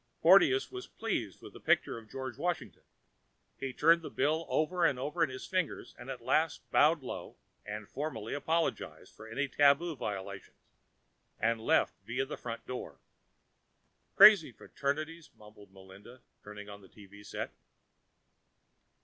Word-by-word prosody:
Porteous 395 0 +6
was 380 0 -7
pleased 120 - -4
with - - -11
the - - -11
picture - - +1
of 110 -1 -17
George 130 -3 -6
Washington. 175 +4 -3 0.8
He 135 - -3
turned 165 +6 +4
the - - -7
bill 155 +4 0
over 175 +3 0
and 140 -6 +3
over 150 +6 -1
in 160 - +1
his 130 0 -7
fingers, 185 -4 -2
at 125 0 -8
last 155 +5 0
bowed 155 0 +4
low - - -7 0.3
and 105 0 -6
formally, 130 -7 -5
apologized 160 +3 -2
for 110 - -12
any 135 +6 -2
tabu 145 +4 +3
violations, 100 -4 -6 0.8
and 115 +1 +1
left - - +2
via 125 +3 -2
the 145 - -6
front 115 -1 -7
door. 130 - -7 1.2
"Crazy 200 -8 +8
fraternities," 155 +6 -4
muttered 105 -2 -16
Melinda, 95 +6 -15 0.2
turning 105 0 -10
on 100 0 -10
the 95 - -17
TV 100 0 -15
set. - - -5
130 Hz, 140 wpm, -31 LUFS, 110-160 Hz, 1.2 s, Crazy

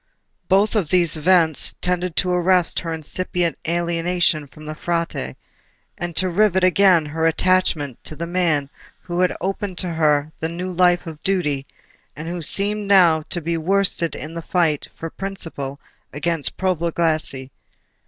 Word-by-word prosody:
Both 195 +3 +3 0.2
these 175 -3 +3
events 160 -1 +3
tended 180 -1 -1
to 180 0 +1
arrest 180 -1 +3
her 165 - -5
incipient 170 +2 -1
alienation 170 -2 0
from 155 +3 -14
the 155 - -5
Frate, 165 - -2 0.6
and 175 -1 -5
to 185 - +2
rivet 190 0 +2
again 185 -3 +4
her 160 +2 0
attachment 165 -6 +1
to 155 - -4
the 170 - -4
man 165 -5 0 0.3
who 175 0 -4
had 180 -1 +2
opened 195 0 -3
to 180 -3 -1
her 150 -2 +2
the 160 - -2
new 180 +2 -4
life 180 0 +3
of 160 -3 -9
duty, 150 -8 0 0.5
and 155 +3 -7
who 175 0 -4
seemed 205 +5 -1
now 175 -5 +5
to 175 - -2
be 165 +1 -2
worsted 180 0 +2
in 155 +2 -7
the 165 - -5
fight 165 -4 0
for 165 0 -6
principle 165 -8 -5 0.3
against 150 -1 -1
profligacy. 165 -6 -1
170 Hz, 150 wpm, -21 LUFS, 155-185 Hz, 0.6 s, now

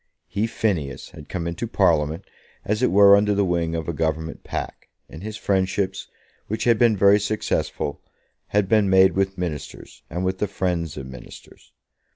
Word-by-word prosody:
He, 105 +3 -1
Phineas, 80 - -2
had 75 - -13
come 90 -3 -3
into 85 +7 -3
Parliament 80 -4 +1 0.4
as 105 +3 -1
it 125 - +3
were 100 0 +7
under 105 0 +2
the 100 0 +2
wing 85 -2 -1
of 80 -2 -4
a 85 - -2
Government 80 +1 -2
pack, - - -6 0.2
and 80 - -11
his 110 +1 -6
friendships, 95 -2 -1 0.4
which 110 - -3
had 115 -2 +3
been 115 -3 +4
very 100 +2 +5
successful, 105 -8 -2 0.5
had 105 -1 +1
been 105 -1 +3
made 95 0 +6
with 95 0 -1
Ministers, 80 -6 -6
and 90 +3 -3
with 95 0 -1
the 105 - 0
friends 90 -5 -2
of 65 - -6
Ministers. 65 -1 -13
95 Hz, 175 wpm, -23 LUFS, 80-105 Hz, 0.5 s, were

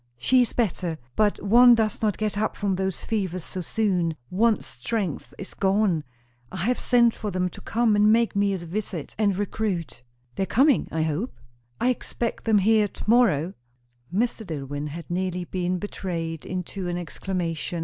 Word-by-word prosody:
"She 255 - +4
is 245 - +1
better. 180 -7 -1 0.2
But 210 -1 +2
one 240 +4 +7
does 220 -2 0
not 215 -3 +1
get 215 -1 -1
up 215 +1 -1
from 200 -2 0
those 190 -1 -2
fevers 185 -5 -2
so 185 - -5
soon. 180 -4 0 0.2
One's 215 +3 +2
strength 145 - -3
is 195 - -8
gone. 195 -4 +2 0.5
I 185 0 -3
have 250 +2 +1
sent 235 -2 +4
for 210 - -4
them 180 -1 0
to - - -11
come 225 -1 +2
and 210 +1 +5
make 230 -1 +3
me 200 0 +2
a 195 - -1
visit 175 -2 -5
and 200 -3 +2
recruit." 195 - -2 0.4
"They - - -1
are - - +2
coming, 275 +3 +3
I 160 -1 0
hope?" 160 - -2 0.4
"I 250 - +2
expect 240 -1 -2
them 220 -2 +4
here 210 +1 +4
to - - -10
morrow." 195 - +3 0.6
Mr. 225 +4 0
Dillwyn 145 -4 -4
had 160 +2 -7
nearly 180 0 -1
been 180 0 -2
betrayed 170 -5 -4
into 185 +1 -4
an 175 0 -2
exclamation. 175 0 -3
195 Hz, 175 wpm, -25 LUFS, 175-220 Hz, 0.6 s, one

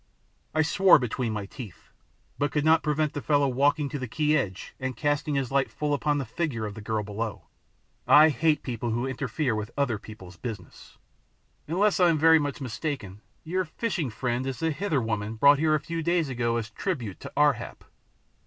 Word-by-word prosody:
I 160 - +4
swore 190 +4 +6
between 125 -2 -2
my 105 -2 -3
teeth, 105 - -11 0.5
but 145 0 0
could 150 0 0
not 160 +1 +5
prevent 150 0 0
the 145 - -4
fellow 145 -1 +2
walking 145 +3 +2
to 145 - -4
the 125 - -4
quay 150 +6 +1
edge 95 -9 -3
and 130 -1 -4
casting 145 0 0
his 135 -2 -1
light 135 0 +2
full 150 -1 -2
upon 145 +1 +1
the 140 - -2
figure 120 -3 -3
of 105 - -5
the 110 - -9
girl 110 0 -2
below. 105 -2 -5 0.6
I 155 +2 +8
hate 155 +2 +1
people 120 -1 -3
who 120 +3 -1
interfere 130 0 -2
with 105 -1 -3
other 125 -7 0
people's 95 -5 -12
business! 105 -6 -9 0.7
"Unless 195 +7 +2
I 180 -1 +5
am 165 - +2
very 160 +1 +6
much 145 -1 -3
mistaken 125 - -5 0.2
your 185 +3 -1
fishing 175 - -3
friend 125 +2 -2
is 135 - -3
the 165 0 0
Hither 155 - -1
woman 110 0 -2
brought 140 +5 +5
here 155 0 +3
a - - +1
few 165 +3 -4
days 170 -2 +1
ago 120 -2 0
as 110 -1 -4
tribute 125 - -4
to - - -9
Ar 145 -1 +5
hap." - - -9
140 Hz, 200 wpm, -27 LUFS, 115-155 Hz, 0.7 s, I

